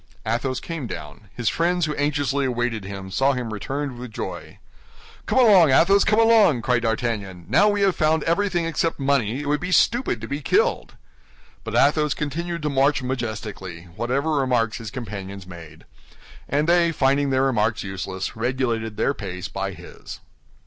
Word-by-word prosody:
Athos 120 +3 -1
came 165 -7 -5
down; 105 0 -9
his 120 -2 -3
friends, 175 +5 +1
who 150 - -2
anxiously 145 -1 0
awaited 120 -4 -2
him, 95 -1 -7
saw 135 +7 +2
him 120 -4 -4
returned 135 +4 -4
with 125 -2 -8
joy. - - -7 0.7
"Come - - 0
along, 200 - +7
Athos, 195 +9 +5
come 215 +1 +3
along!" 220 - +5
cried 125 -1 +1
D'Artagnan; 110 -6 -2
"now 205 +1 +4
we 205 0 0
have 195 -2 +3
found 155 -1 +2
everything 175 0 0
except 165 0 -1
money, 135 -3 +1
it - - -6
would 150 0 +1
be 180 +2 -4
stupid 235 - +2
to 115 - -7
be 140 +4 -4
killed." - - +1 0.7
But - - -5
Athos 150 +1 +3
continued 170 +3 -4
to - - 0
march 135 0 +2
majestically, 110 -8 -5
whatever 135 +8 -1
remarks 125 -6 +1
his 115 -2 -6
companions 100 -6 -7
made; 80 -4 -12 0.6
and 145 +3 +1
they, 170 -1 +4
finding 140 -1 +2
their 130 0 +2
remarks 110 -4 +1
useless, 95 -1 -5
regulated 115 -2 -2
their 140 - +1
pace 95 -5 -6
by 95 0 -3
his. - - -11
130 Hz, 165 wpm, -23 LUFS, 110-155 Hz, 0.7 s, along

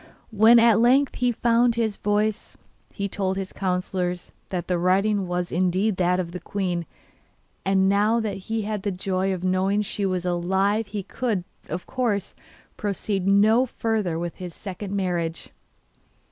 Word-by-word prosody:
When 220 +3 +6
at 230 -2 +5
length 260 +4 +3
he 245 -1 +2
found 235 0 +2
his 220 -3 -1
voice 210 +1 -1 0.3
he 200 -1 -3
told 190 -1 -2
his 190 -1 -5
councillors 180 -1 -2 0.2
that 180 -3 -3
the 180 -1 0
writing 195 +2 +2
was 180 0 -2
indeed 185 +3 +1
that 180 0 +2
of 170 -2 -3
the 180 - -6
queen, 180 -5 -3 0.8
and 190 0 +3
now 210 +4 +3
that 220 -2 -2
he 225 -1 -1
had 210 -1 -3
the 205 - -1
joy 190 0 -1
of 185 -1 -3
knowing 190 +3 +1
she 200 0 -2
was 180 -1 -2
alive 190 +5 +1
he 200 -1 -4
could, 220 -3 -2 0.3
of 175 +3 -4
course, 225 -7 -1 0.4
proceed 200 -1 -2
no 215 +6 +4
further 215 -8 -1
with 170 0 -4
his 180 -3 -7
second 195 0 -7
marriage. 175 -4 -2
195 Hz, 160 wpm, -24 LUFS, 180-215 Hz, 0.8 s, When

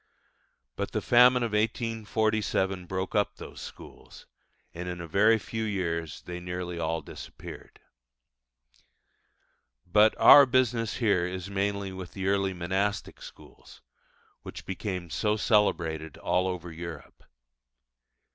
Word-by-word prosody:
But - - -4
the - - -1
famine 125 +1 +6
of 115 - -2
1847 110 -4 -1
broke 95 +1 -3
up 105 -2 +1
those - - -10
schools, - - -12 0.5
and 90 +1 -6
in 90 0 -5
a 85 - -6
very 105 +7 +4
few 110 +1 -5
years 85 -6 -3
they 90 0 -6
nearly 90 -1 -5
all 80 0 -1
disappeared. - - -11 2.1
But 105 +4 +4
our 140 -2 +9
business 120 -3 +1
here 100 -7 +1
is 95 +1 -6
mainly 100 0 -1
with 95 -2 -8
the 95 -1 -5
early 100 -1 0
monastic 95 +4 -2
schools, - - -14 0.6
which - - -9
became 95 -3 -5
so 105 +4 0
celebrated 80 - +1
all 90 +1 0
over 90 -2 -5
Europe. 85 0 -9
95 Hz, 120 wpm, -28 LUFS, 90-110 Hz, 2.1 s, our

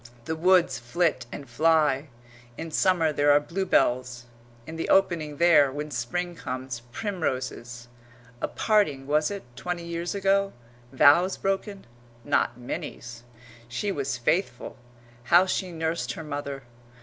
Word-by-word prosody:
The 160 - -2
woods 180 +2 +3
flit 130 0 0
and 140 - -8
fly 150 +1 +2 0.5
in 165 0 -6
summer 165 -2 +2
there 145 0 +3
are 145 - +6
bluebells; 130 -8 0 0.4
in 160 - -8
the 165 - -4
opening 165 -6 +2
there, 160 -5 +5
when 150 +2 -5
Spring 175 +9 -3
comes, 130 -5 -5
primroses. 130 - -4 0.5
A - - 0
parting, 180 -12 +1
was 150 +2 +2
it, 200 -1 -6
twenty 175 +4 -4
years 170 +2 -4
ago? 195 0 +1 0.4
Vows 170 +8 +5
broken? 195 +1 -3 0.4
Not - - +1
Minnie's!... 120 -1 -7 0.5
She 125 +12 -2
was 140 -6 -2
faithful. 125 0 -1 0.5
How 175 +8 +6
she 185 0 -2
nursed 165 0 -2
her 160 - -7
mother! 140 -2 -5
155 Hz, 130 wpm, -26 LUFS, 130-180 Hz, 0.5 s, are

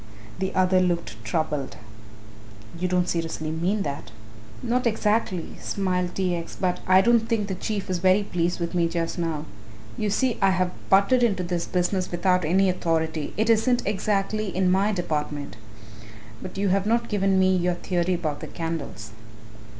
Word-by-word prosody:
The 190 0 -1
other 185 0 +4
looked 170 -12 -2
troubled. 145 +4 -2 1.0
"You 180 - 0
don't 180 -1 +1
seriously 165 -2 -2
mean 185 +6 0
that." 140 -5 -5 0.5
"Not 245 +1 +1
exactly," 210 -5 0
smiled 180 -2 -1
T. 185 -2 0
X., 170 -1 -6
"but 180 -2 0
I 185 0 +7
don't 235 +1 +3
think 225 -3 +1
the 195 - -3
Chief 200 +2 -3
is 185 -2 -1
very 190 +3 +4
pleased 175 -2 -1
with 170 +1 -3
me 170 -2 +2
just 165 +1 -2
now. 160 -3 -2 0.5
You 210 - 0
see 245 +3 0
I 195 - +5
have 185 -1 +1 0.2
butted 200 +6 +4
into 200 -6 +2
this 175 -1 -2
business 185 +1 0
without 180 +1 +1
any 190 +5 +3
authority 160 -4 -1
it 220 +1 +1
isn't 230 +2 +3
exactly 205 +1 0
in 185 0 +1
my 195 +3 +3
department. 150 - -3 0.9
But 185 - -8
you 200 0 +1
have 195 +2 +1
not 235 +1 +1
given 195 -2 +1
me 185 0 +4
your 180 0 +1
theory 180 0 0
about 155 -4 -3
the - - -7
candles." 160 -10 -5
185 Hz, 165 wpm, -25 LUFS, 170-200 Hz, 1.0 s, I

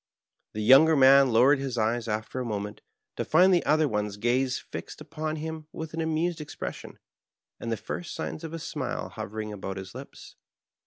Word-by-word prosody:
The 110 - -3
younger 140 +8 +7
man 135 -1 +7
lowered 130 +5 +5
his 135 -3 -3
eyes 115 +1 0
after 110 +3 -3
a - - -2
moment, 105 -2 -4 0.4
to - - -1
find 185 +4 +5
the 175 - +3
other 155 +1 +4
one's 105 -4 -2
gaze 125 +4 +1
fixed - - -8
upon 155 0 -4
him 160 0 -6
with 160 -1 -7
an 165 - -2
amused 160 +1 -1
expression, 150 - -7 0.6
and 115 - -4
the 115 - 0
first 175 - -6
signs 155 - -5
of 160 - -6
a 165 - -4
smile 160 - -4
hovering 105 +1 -6
about 95 -1 -6
his 95 0 -8
lips. 130 +3 -11
135 Hz, 180 wpm, -27 LUFS, 110-155 Hz, 0.6 s, younger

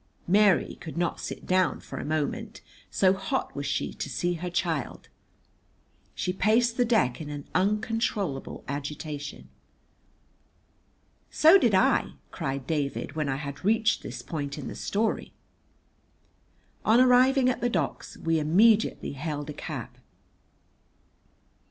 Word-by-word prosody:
Mary 200 +1 +3
could 160 0 -7
not 175 -1 -1
sit - - -6
down 185 -1 +2
for - - -8
a - - -4
moment, 210 +9 -3 0.3
so 190 -1 +3
hot 190 0 -3
was 140 0 -3
she 140 - -2
to - - -5
see 175 0 -1
her 175 +1 -4
child. 170 -5 -2 1.1
She 180 - -2
paced 230 +5 +2
the 245 - +2
deck 165 - +1
in 145 -2 -6
uncontrollable 205 - -1
agitation. 145 +1 -5 1.8
"So 325 +5 +6
did 230 - +3
I!" 190 - +3 0.2
cried 135 -5 -4
David, 145 -3 -2
when 155 -2 -1
I 135 - 0
had 140 +2 -6
reached 220 +2 +2
this - - -7
point 145 -4 -4
in 150 - -6
the - - -7
story. 215 +2 -1 1.5
On 225 +3 +5
arriving 255 +1 +5
at 255 - 0
the 245 - +1
docks 165 - -3
we 165 0 0
immediately 205 +9 +3
hailed 145 +1 -4
a - - -7
cab. - - -6
175 Hz, 130 wpm, -27 LUFS, 145-220 Hz, 1.8 s, So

